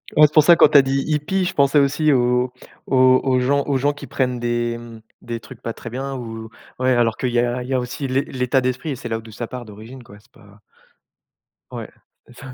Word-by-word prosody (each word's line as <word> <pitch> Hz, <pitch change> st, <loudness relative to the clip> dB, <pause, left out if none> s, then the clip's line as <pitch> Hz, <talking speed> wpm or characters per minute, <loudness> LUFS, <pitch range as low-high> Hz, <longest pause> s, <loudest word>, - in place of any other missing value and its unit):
Ouais, 150 Hz, 0 st, +7 dB
c'est 150 Hz, -, -19 dB
pour 155 Hz, -, +6 dB
ça 170 Hz, +3 st, +7 dB
quand -, -, +7 dB
tu -, -, +6 dB
as 140 Hz, -, +9 dB
dit 135 Hz, +1 st, -1 dB
hippie, 155 Hz, +5 st, 0 dB
je 190 Hz, -, -2 dB
pensais 140 Hz, +1 st, +4 dB
aussi 145 Hz, +2 st, +2 dB
aux 125 Hz, 0 st, +1 dB, 0.3 s
aux 130 Hz, -1 st, +4 dB
aux 130 Hz, -2 st, +2 dB
gens 140 Hz, +2 st, +1 dB
aux 140 Hz, -2 st, 0 dB
gens 145 Hz, +3 st, +1 dB
qui 145 Hz, -, -10 dB
prennent 125 Hz, -2 st, -2 dB
des 120 Hz, 0 st, -1 dB, 0.5 s
des 115 Hz, -1 st, -5 dB
trucs 125 Hz, +1 st, -14 dB
pas 115 Hz, -, -4 dB
très 120 Hz, -, -9 dB
bien 135 Hz, +3 st, -5 dB
ou 115 Hz, -3 st, -7 dB, 0.3 s
ouais 130 Hz, 0 st, +1 dB
alors 120 Hz, -3 st, +2 dB
qu'il 125 Hz, -2 st, -2 dB
y 120 Hz, -, +1 dB
a 120 Hz, +1 st, -1 dB
il 125 Hz, -, -10 dB
y -, -, -1 dB
a 130 Hz, -, +2 dB
aussi 125 Hz, +3 st, -5 dB
l'é 130 Hz, +1 st, +1 dB
l'état 130 Hz, 0 st, -1 dB
d'esprit 130 Hz, +5 st, -2 dB
et -, -, -3 dB
c'est 120 Hz, -1 st, -8 dB
là 115 Hz, 0 st, -2 dB
d'où 110 Hz, 0 st, -13 dB
ça 115 Hz, +2 st, -6 dB
part 125 Hz, 0 st, -8 dB
d'origine 110 Hz, +4 st, -12 dB
quoi, 105 Hz, -3 st, -15 dB
c'est 120 Hz, +4 st, -28 dB
pas 105 Hz, -2 st, -20 dB, 1.1 s
Ouais, -, -, -7 dB, 0.4 s
c'est 120 Hz, -, -18 dB
pas 135 Hz, -1 st, -9 dB
125 Hz, 250 wpm, -20 LUFS, 120-135 Hz, 1.1 s, as